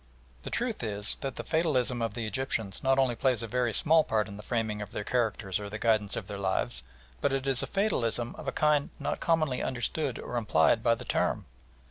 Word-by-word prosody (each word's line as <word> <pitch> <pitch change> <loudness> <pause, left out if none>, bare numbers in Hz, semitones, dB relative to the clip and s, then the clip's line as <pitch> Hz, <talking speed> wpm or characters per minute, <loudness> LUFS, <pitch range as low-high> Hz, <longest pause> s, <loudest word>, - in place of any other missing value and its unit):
The - - -6
truth 235 -2 -2
is 105 -2 -2
that 135 -1 -3
the - - -5
fatalism 130 -7 +1
of 115 -2 -2
the 115 -2 -3
Egyptians 110 -4 -1
not 135 0 +3
only 130 -2 +3
plays 125 -2 +1
a - - -3
very 125 0 0
small 160 +7 +5
part 110 -5 0
in 100 - -8
the 105 - -8
framing 110 -2 -2
of 105 - -5
their 105 - -3
characters 110 -5 0
or 105 -1 -6
the 105 - -5
guidance 110 -3 +2
of - - -5
their 100 - -5
lives, 80 -10 -1 0.4
but - - +2
it 135 0 -1
is 135 -2 +3
a - - -3
fatalism 120 - 0
of 150 - -9
a - - +1
kind 150 0 +2
not 140 - -2
commonly 155 -6 +1
understood 130 +2 -2
or 120 - -4
implied 110 -1 +3
by 115 0 +3
the - - -9
term. - - 0
120 Hz, 220 wpm, -29 LUFS, 105-135 Hz, 0.4 s, small